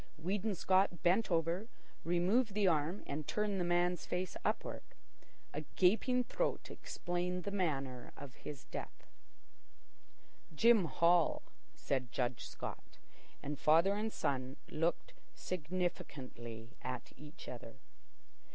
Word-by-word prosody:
Weedon 200 +5 -1
Scott 185 0 +3
bent 190 +6 +4
over, 170 +4 +1 0.4
removed 195 +6 +2
the 205 -2 +4
arm 165 +3 +1
and 150 +1 -4
turned 210 -2 0
the - - +2
man's 175 0 +2
face 180 0 -2
upward. - - -1 0.7
A 150 - -2
gaping 225 +7 +4
throat - - -1
explained 180 +1 -2
the 200 - -3
manner 135 -10 -1
of 140 -2 -8
his 140 0 -8
death. - - -7 1.5
"Jim 225 +1 +6
Hall," 170 +1 +3 0.3
said 130 -3 -1
Judge 125 -1 -1
Scott, - - -7 0.5
and 145 0 -3
father 165 +6 +5
and 215 +2 -1
son 130 -4 -1
looked 165 +2 0 0.2
significantly 140 -9 -4
at 125 0 -5
each 150 +3 -11
other. 120 -1 -7
175 Hz, 115 wpm, -36 LUFS, 145-190 Hz, 1.5 s, Jim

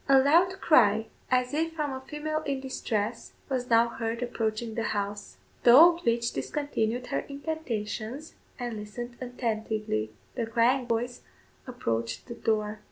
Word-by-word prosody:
A 270 - +8
loud 340 +8 +4
cry, 220 -7 +5 0.2
as 250 +1 +2
if 325 +2 0
from 300 -4 -2
a 260 - -5
female 305 +3 -3
in 280 -3 -2
distress, 230 -4 -3 0.2
was 255 -2 -2
now 230 0 +5
heard 230 0 -3
approaching 225 -1 -2
the 230 - -2 0.2
house; 205 0 -4 0.2
the 240 - +7
old 340 +5 +8
witch 235 0 +2
discontinued 250 -5 -2
her - - +2
incantations, 280 -3 -4 0.2
and 240 -3 -4
listened 240 +4 -7
attentively. 220 - -2 0.2
The 235 -3 -2
crying 240 +3 +2
voice 240 +1 -1 0.5
approached 115 - -3
the - - -7
door. 215 -2 -1
240 Hz, 145 wpm, -28 LUFS, 220-275 Hz, 0.5 s, A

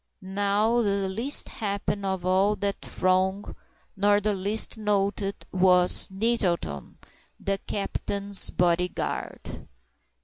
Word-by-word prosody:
Not 205 +4 0
the 200 -2 0
least 230 +9 +2
happy 200 -1 -3
of 190 -2 -3
all 190 +3 +2
that 200 -1 -3
throng, 190 +2 -1 0.4
nor 205 +1 +3
the 210 +1 0
least 200 +3 +1
noted, 200 -2 -2
was 180 -1 +5
NETTLETON, 190 - -2 0.4
THE 195 0 -2
CAPTAIN'S 200 0 -1
BODY 175 0 +1
GUARD. - - -6
200 Hz, 105 wpm, -25 LUFS, 185-205 Hz, 0.4 s, was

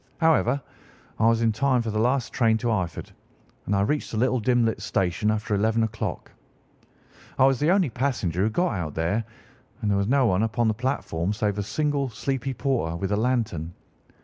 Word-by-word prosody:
However, 150 -5 +3 0.6
I 110 - +4
was 115 0 +3
in 115 - +3
time 125 +2 +1
for 115 - -3
the 110 - -1
last 125 +2 +1
train 110 -2 +3
to 120 +1 -1
Eyford, 95 -6 -3 0.6
and 100 - +1
I 100 - +2
reached 145 +9 0
the 110 - -4
little 130 +2 +2
dim 120 +1 +2
lit 115 - -1
station 95 +3 0
after 110 0 -1
eleven 110 +3 +2
o'clock. 110 -1 -4 1.1
I 130 - +5
was 135 -2 +3
the 150 - +2
only 185 -7 +3
passenger 110 -9 -1
who 105 - +2
got 175 +8 0
out 85 -7 -4
there, 85 +8 0 0.6
and 105 - +1
there 100 - +2
was 100 - 0
no 135 +2 +3
one 95 -3 +2
upon 115 +1 +1
the 110 - +2
platform 105 -7 -2
save 105 -1 -1
a - - +1
single 140 +6 -1
sleepy 135 +2 -3
porter 115 - -1
with 95 +3 -3
a - - +3
lantern. 110 -8 -1
115 Hz, 200 wpm, -25 LUFS, 105-130 Hz, 1.1 s, I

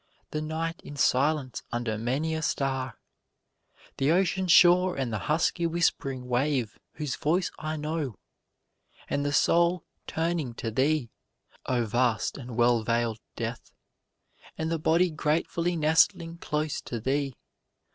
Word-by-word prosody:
The 155 - -2
night 165 +2 -3
in 145 - -9
silence 140 0 +1
under 120 -2 -1
many 130 +9 -1
a 160 - -2
star, 135 -4 -1 1.0
The 135 - +1
ocean 185 +1 +2
shore 180 +1 +6
and 130 -4 -2
the 105 - -1
husky 170 +2 +2
whispering 135 -6 0
wave 125 -2 0
whose 150 -4 -3
voice 170 +4 0
I 155 0 -3
know, 150 -5 -3 0.9
And 145 - -1
the 145 - 0
soul 170 +3 +3 0.2
turning 160 -7 -1
to 115 - -4
thee, 135 0 +1 0.6
O 120 -2 +1
vast 120 +3 0
and 120 -3 -8
well 120 -1 +4
veil'd 115 0 0 0.2
Death, 115 +1 -5 0.9
And 160 +1 -2
the 165 - 0
body 170 +3 +3
gratefully 165 +3 0
nestling 165 +2 +2
close 150 -2 -2
to 120 - -4
thee. 135 +2 -1
150 Hz, 135 wpm, -28 LUFS, 125-165 Hz, 1.0 s, shore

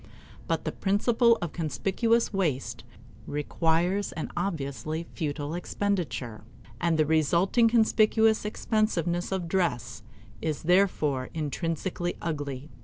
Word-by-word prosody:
But - - -1
the - - -1
principle 230 +4 +3
of 170 - -4
conspicuous 205 +9 0
waste 155 - -1 0.4
requires 165 +6 0
an 160 - -5
obviously 160 -2 -3
futile 145 -1 -3
expenditure; 175 - -2 0.4
and 170 0 +1
the 155 - +3
resulting 170 - +3
conspicuous 220 -1 +3
expensiveness 210 -5 0
of 185 -3 -2
dress 125 - -1 0.4
is 155 -2 -2
therefore 155 -7 +2
intrinsically 165 +3 -2
ugly. 145 -3 -4
170 Hz, 105 wpm, -28 LUFS, 150-200 Hz, 0.4 s, principle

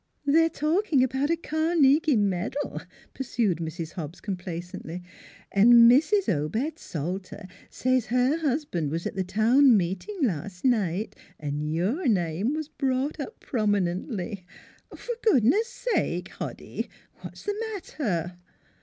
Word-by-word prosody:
' - - -44
They're 325 +3 +4
talking 310 -2 +1
about 265 +3 0
a 335 - +3
Carnegie 315 -2 +3
medal," 205 +6 -1 0.3
pursued 230 -9 -1
Mrs. 165 0 -5
Hobbs 160 0 -7
complacently. 180 -2 -6 0.2
" - - -23
And 215 +5 +6 0.2
Mrs. 370 - +3
Obed 220 - -1
Salter 185 +5 -5 0.2
says 255 -2 0
her 250 +5 +2
husband 280 - -1
was 165 +3 -3
at - - -3
the 190 - 0
town 230 +6 +5
meeting 190 - -3
last 180 - -2
night, 210 -5 +1 0.2
and 150 0 -3
your 210 - 0
name 190 - +1
was 310 -1 -3
brought 270 +1 -1
up 295 +11 -6
prominently 200 -2 -1 0.5
For 485 - -6
goodness 400 - +4
sake! 485 0 -2
Hoddy, - - -6 0.3
what - - -9
is - - -12
the 415 +2 -2
matter? 180 - -3
230 Hz, 130 wpm, -26 LUFS, 180-295 Hz, 0.5 s, And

